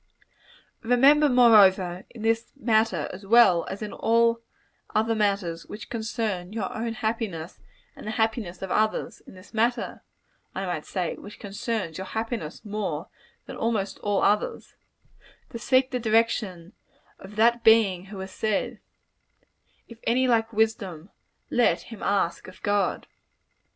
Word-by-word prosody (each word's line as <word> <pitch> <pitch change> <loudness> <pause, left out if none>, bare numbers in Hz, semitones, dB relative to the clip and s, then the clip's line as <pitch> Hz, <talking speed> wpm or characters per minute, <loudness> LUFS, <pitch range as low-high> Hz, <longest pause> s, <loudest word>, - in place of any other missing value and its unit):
Remember, 275 +6 +5
moreover, 195 -7 +5
in 225 -3 -10
this 225 +1 0
matter, 220 - +1
as 190 +2 -9
well 195 -5 +5
as 200 +3 -5
in 210 - -6
all 230 0 +2 0.5
other 220 +1 +2
matters 200 -6 -1
which 210 - -9
concern 220 -5 -3
your 210 -3 -4
own 225 +1 -3
happiness 220 -8 -4 0.4
and - - -10
the - - -2
happiness 220 -5 -1
of 190 - -5
others 215 0 0
in - - -13
this 185 +1 -16
matter, 235 +3 0 0.5
I 195 - -3
might 175 -4 -4
say, 180 -4 -2
which 205 0 -11
concerns 200 -4 -4
your 190 - -5
happiness 220 -5 -4
more 195 -6 -4 0.4
than - - -8
almost 215 -4 -1
all 205 -1 0
others 210 +1 0 0.8
to 230 - -6
seek 260 +2 +2
the 250 - -1
direction 215 -6 0 0.5
of 195 +2 -12
that 235 +2 +3
Being 210 -5 +4
who 195 +1 -10
has 190 0 -7
said, 215 -2 -2 1.1
"If 230 -1 -13
any 255 +2 +2
lack 225 -2 +2
wisdom, 205 -6 -1 0.4
let 240 - +3
him 225 -3 -11
ask 195 -4 0
of 185 0 -13
God." 205 -1 0
215 Hz, 140 wpm, -26 LUFS, 190-230 Hz, 1.1 s, Remember